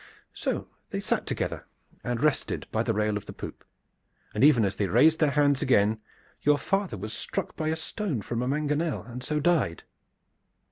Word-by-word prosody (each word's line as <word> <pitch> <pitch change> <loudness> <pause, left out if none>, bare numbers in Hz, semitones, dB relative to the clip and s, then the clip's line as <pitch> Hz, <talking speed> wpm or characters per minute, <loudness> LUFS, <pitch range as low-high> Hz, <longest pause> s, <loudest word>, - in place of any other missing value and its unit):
So - - -2 0.2
they - - -3
sat - - -1
together - - -3 0.4
and 120 +1 -2
rested 150 -2 +1
by 110 - +1
the 115 -2 0
rail 105 0 +1
of 105 - -9
the - - -7
poop; - - -8 0.7
but 105 - -1
even 135 -7 +6
as 100 - -1
they 100 - +1
raised 150 - +5
their 155 - +4
hands 145 -1 +3
again 110 -3 +3 0.4
your 145 0 +4
father 195 - -1
was 110 +3 -5
struck - - -3
by 155 - -2
a 160 - +1
stone 160 - -3
from 120 +2 -2
a 125 - -1
mangonel 150 +3 0
and 125 +1 -8
so 150 +3 0
died." 145 - +1
135 Hz, 185 wpm, -27 LUFS, 110-155 Hz, 0.7 s, even